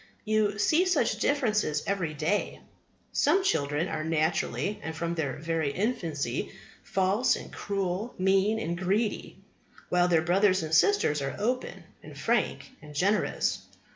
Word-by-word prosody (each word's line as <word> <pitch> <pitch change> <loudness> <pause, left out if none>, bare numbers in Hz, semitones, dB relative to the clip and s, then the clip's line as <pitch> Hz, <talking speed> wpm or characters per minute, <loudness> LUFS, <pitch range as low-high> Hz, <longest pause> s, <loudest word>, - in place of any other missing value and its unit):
You 215 -1 +1
see 315 - +3
such 245 -11 +1
differences 215 - +1
every 180 -6 -2
day. 160 +8 -1 0.5
Some 385 - +3
children 145 - 0
are 155 -3 -3
naturally, 160 +5 0
and 160 0 -5
from 170 +1 -2
their 150 -5 -2
very 160 -1 -1
infancy, 170 - -2 0.3
false 195 +7 +1
and - - -9
cruel, 195 +3 -3
mean 195 +3 +2
and 170 -6 -2
greedy; 200 +5 -1 0.5
while 180 0 +3
their 165 -3 +3
brothers 185 +1 +3
and 155 0 -5
sisters 285 - +3
are 135 -1 -3
open 250 +5 -2 0.2
and - - -12
frank - - -1
and 150 -1 -12
generous. 200 +7 +1
185 Hz, 140 wpm, -28 LUFS, 160-215 Hz, 0.5 s, see